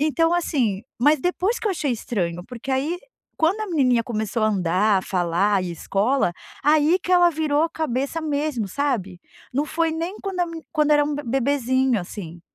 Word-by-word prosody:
Então, 330 +2 +2
assim, 250 - 0 0.2
mas 295 +4 +4
depois 365 - 0
que - - -4
eu - - +2
achei 310 -7 -1
estranho, 175 -7 -3
porque 250 +2 -7
aí, 285 +7 0 0.4
quando 340 +7 +1
a 430 - -2
menininha 260 - +2
começou 220 -2 -2
a - - +3
andar, 195 +1 +2
a - - -4
falar 185 +2 +1
e - - -3
ir - - -4
a - - -4
escola, 200 - 0 0.3
aí 305 +4 +4
que 365 0 -2
ela 350 -1 +6
virou 305 -1 +1
a 330 - +2
cabeça 300 0 -2
mesmo, 290 -6 -1
sabe. 195 -6 -2 0.3
Não 285 +4 0
foi 325 +1 0
nem 335 +5 -3
quando 385 -2 -3
a 350 - +2
me 330 -1 -8
quando 300 -1 +3
era 295 0 +5
um 295 0 -2
bebezinho, 260 -2 +1
assim, 175 -2 -8
275 Hz, 195 wpm, -23 LUFS, 215-320 Hz, 0.4 s, ela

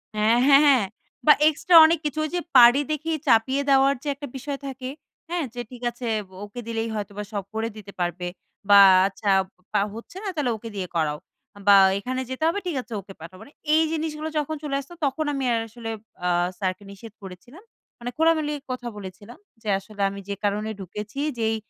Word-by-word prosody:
অ্যা 215 0 +1 0.2
হ্যাঁ, 280 0 +7
হ্যাঁ। 260 -8 +5 0.4
বা 300 - +9 0.2
এক্সট্রা 335 +3 +1
অনেক 325 0 +2
কিছু 295 +1 -2
ওইযে 350 +3 -2 0.2
পারি 245 +4 +8
দেখে 310 +2 -2 0.2
চাপিয়ে 260 +4 +3
দেওয়ার 275 0 +5
যে - - -7
একটা 285 +1 -8
বিষয় 280 +1 -5
থাকে, 260 -1 -6 0.4
হ্যাঁ? 345 -2 -1
যে, 245 - -4
"ঠিক 250 -1 -11
আছে 240 0 -7 0.2
বো - - -20
ওকে 205 +4 -9
দিলেই 225 0 -2
হয়তোবা 205 0 -5
সব 200 -2 -2
করে 220 +1 -1
দিতে 205 -2 -10
পারবে 175 0 -2 0.4
বা, 200 0 +9 0.3
আচ্ছা 200 +1 -4 0.4
বা 205 - +3
হচ্ছে 235 +11 -10
না? - - -4
তাহলে 270 -6 0
ওকে 230 +2 -9
দিয়ে 185 -2 -3
করাও। 150 -2 0 0.5
বা, 200 - +9 0.2
এইখানে 255 +5 -3
যেতে 260 +4 -4
হবে, 370 +5 0
ঠিক 335 - -2
আছে, 240 - -11
ওকে 195 +1 -13
পাঠাও।" 185 +3 -10
মানে 285 - -13 0.2
এই 320 - +5
জিনিসগুলা 315 -1 -3
যখন 300 +1 -3
চলে 285 -2 -2
আসতো, 280 +5 -10
তখন 285 +3 -1
আমি 275 -1 -2
আর 230 - +1
আসলে 225 0 -8 0.4
আ - - +2 0.3
স্যারকে 185 0 -2
নিষেধ 205 +2 -12
করেছিলাম। 215 - -12 0.4
মানে 245 +1 -5
খোলামেলা 315 -2 +2 0.2
কথা 250 -1 -5
বলেছিলাম 205 +5 -10 0.2
যে, 220 - -11
"আসলে 205 0 -10
আমি 200 - -8
যে 200 - -2
কারণে 210 +1 -1
ঢুকেছি, 210 +6 -7 0.2
যেই 225 0 +1
240 Hz, 195 wpm, -24 LUFS, 205-290 Hz, 0.5 s, বা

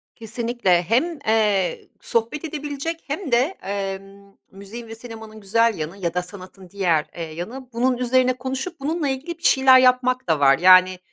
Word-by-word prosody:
Kesinlikle. 230 -5 0
Hem, 270 - 0
eee, 210 -5 +1
sohbet 235 +7 -2
edebilecek 300 +2 -5
hem 295 +1 -4
de, 235 - +5 0.2
emm, 195 0 -6 0.2
müziğin 200 +5 -10
ve 225 - -9
sinemanın 220 -2 -11
güzel 230 +2 +1
yanı 160 +4 -6
ya 170 -4 -3
da 180 - 0
sanatın 185 0 -13
diğer, 175 -5 0
eee, 165 -2 -6
yanı 240 +10 -8
bunun 250 +2 +1
üzerine 255 +1 +2
konuşup 265 +7 -5
bununla 300 +1 -2
ilgili 285 +6 -5
bir 335 - -26
şeyler 265 -1 +6
yapmak 255 -1 +2
da 160 -2 +2
var. 135 -1 +5
Yani, 185 +1 +6
225 Hz, 160 wpm, -22 LUFS, 190-260 Hz, 0.2 s, şeyler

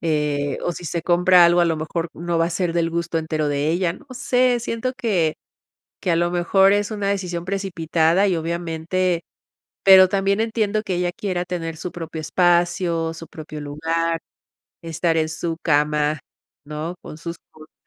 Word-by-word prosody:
eh, 150 -3 0
o 175 - 0
si 175 - -9
se 170 +2 -3
compra 180 +1 +5
algo, 175 +1 +5
a - - +5
lo 165 - 0
mejor 165 +2 -3
no 170 0 -2
va 165 - +3
a - - -4
ser 175 0 -1
del 170 -1 +1
gusto 170 0 -1
entero 155 -1 -1
de 145 +1 0
ella, 170 +1 +1
no 280 - -15
sé, 250 -1 +2
siento 230 +2 -2
que 180 -11 +1 0.7
que 185 - -1
a - - +3
lo 175 +1 +1
mejor 190 +3 +3
es 205 +1 0
una 205 -2 -2
decisión 180 -4 -2
precipitada 180 -1 +1
y, 185 - +1
obviamente 170 +2 -1 0.6
pero 190 -1 +8
también 195 +2 +1
entiendo 215 -2 0
que 190 - -2
ella 175 0 0
quiera 180 -3 -3
tener 165 -3 -4
su 175 +1 -6
propio 165 -2 -6
espacio, 175 0 +1
su 165 0 -9
propio 155 -1 -9
lugar, 165 +3 -1 0.6
estar 165 0 -1
en 155 - +1
su 165 +1 -3
cama, 150 0 +2 0.5
¿no?, 155 +4 -5
con 155 - -10
sus 170 +1 -6
cosas. 155 0 -17
170 Hz, 180 wpm, -22 LUFS, 160-185 Hz, 0.7 s, pero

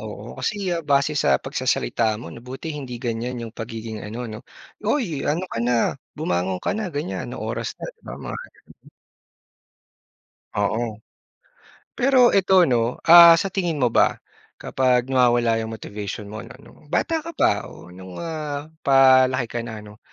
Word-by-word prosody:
oo, - - -8
kasi 200 -4 -2 0.2
base 140 +1 +3
sa 70 - +3
pagsasalita 110 - -1
mo 115 - -9
'no, 115 - -10
buti 130 +6 -7
hindi 135 -5 -6
ganyan 120 +1 -3
'yong 115 -2 -7
pagiging 110 -1 -6
ano 115 +4 -6
'no 110 0 -7 0.4
"Uy, 210 - -1
ano 165 +5 0
ka 115 - -3
na, 120 +1 +1 0.4
bumangon 90 +1 -1
ka - - +1
na." 210 -1 -3
ganyan, 140 - -4
"Ano 125 - -7
oras 115 0 -4
na." - - -8
'di - - -41
ba? - - -5
Mga - - -6 0.3
ganun. - - -19 1.7
Oo. 110 +1 -1 1.0
Pero 255 -1 +5
ito 190 -1 +4
'no, 120 -3 +1
ah, 170 0 +10
sa 195 +4 0
tingin 175 -6 -2
mo 120 - +3
ba - - +3 0.5
kapag 125 -1 +1
nawawala 120 -3 +3
yung 110 0 -4
motivation 105 -1 -7
mo 110 - -7
ano, - - -11
nung - - -18
bata 330 -1 +1
ka 335 - -6
pa 105 - +1
o 90 - -13
nung, 95 0 -11
ah, 155 -2 -5 0.2
palaki 130 -2 +5
ka - - -2
na 110 -2 -7
'no, 105 0 -14
125 Hz, 165 wpm, -23 LUFS, 110-155 Hz, 1.7 s, ah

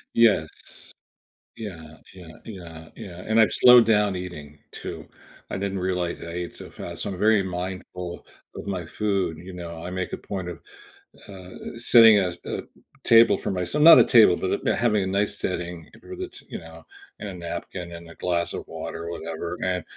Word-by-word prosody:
Yes. 110 -9 +4 1.1
Yeah, 80 -8 -9 0.2
yeah, 90 -3 -12 0.2
yeah, 85 -6 -10
yeah, 90 -1 -9
and 110 +1 +3
I've 110 -5 +5
slowed 125 -2 +7
down 105 -3 +3
eating 75 -5 -8
too, - - -7 0.5
I - - -2
didn't 100 -1 -3
realize 90 -2 -2
I - - -8
ate 85 +1 -5
so - - -11
fast, - - -7
so 100 - -3
I'm 90 - -7
very 105 -2 +4
mindful 90 -1 -6 0.3
of - - -8
my 90 -4 -3
food, 95 -4 -1
you 90 +2 -10
know? 85 -2 -8
I 90 - -5
make 90 0 -4
a - - -2
point 95 -3 -6
of, 85 - -8 0.7
uh, 95 -2 -10 0.3
sitting 115 -2 +7
at 90 -2 -2
a - - -4 0.4
table 115 0 +6
for - - -3
mys 90 +6 -3
not 160 +2 +9
a - - +6
table, 110 -8 +6
but, 95 - -2
uh, - - +3
having 105 -4 +2
a 95 - -2
nice 100 +2 0
setting 85 -2 -4
where 370 - -9
the 370 0 -5
t - - -15
you - - -5
know, - - -13 0.3
and 105 - -6
a - - -7
napkin 85 0 -6
and 85 0 -10
a 85 - -13
glass 85 -2 -1
of - - -5
water 85 +1 -6
or 85 - -5
whatever, 85 +1 -5
and 90 -2 -1
90 Hz, 190 wpm, -24 LUFS, 85-105 Hz, 1.1 s, not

